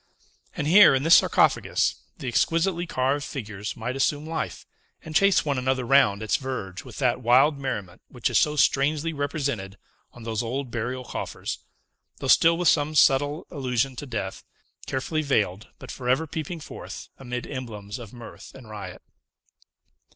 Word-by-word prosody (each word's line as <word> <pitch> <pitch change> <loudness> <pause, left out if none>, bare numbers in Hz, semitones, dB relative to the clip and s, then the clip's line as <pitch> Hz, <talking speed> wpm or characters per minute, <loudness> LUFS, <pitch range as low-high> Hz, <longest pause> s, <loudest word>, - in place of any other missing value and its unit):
And 145 - -2
here, 175 -2 +7
in 135 - 0
this 165 +2 +8
sarcophagus, - - +2 0.2
the - - -7
exquisitely 170 +7 +1
carved 135 0 0
figures 105 -7 -6
might 120 +3 -4
assume 145 +2 0
life, 155 - -4 0.4
and 155 - -8
chase 195 -2 +4
one 140 -3 0
another 130 0 0
round 110 -6 +4
its 110 - +1
verge 105 -9 -5
with - - -11
that 125 -2 +1
wild 135 +5 +4
merriment 105 -10 -5
which 125 -3 -2
is - - +3
so 150 -3 +1
strangely 150 +4 +2
represented 140 -9 -3 0.3
on 120 - -13
those 110 0 -2
old 125 +2 -4
burial 125 +2 -3
coffers: - - -5 0.6
though - - -7
still 165 0 +5
with 175 0 0
some 150 0 +3
subtile 145 +3 +3
allusion 130 -3 -1
to 145 - -6
death, 105 -6 -4 0.4
carefully 155 +4 -1
veiled, 110 -8 0
but - - -9
forever 130 +5 0
peeping 160 +2 -5
forth - - -9
amid 125 -2 -5
emblems 115 -4 -7
of 115 -3 -10
mirth 120 -2 -12
and 120 -5 -12
riot. 105 -2 -8
130 Hz, 160 wpm, -25 LUFS, 115-150 Hz, 0.6 s, this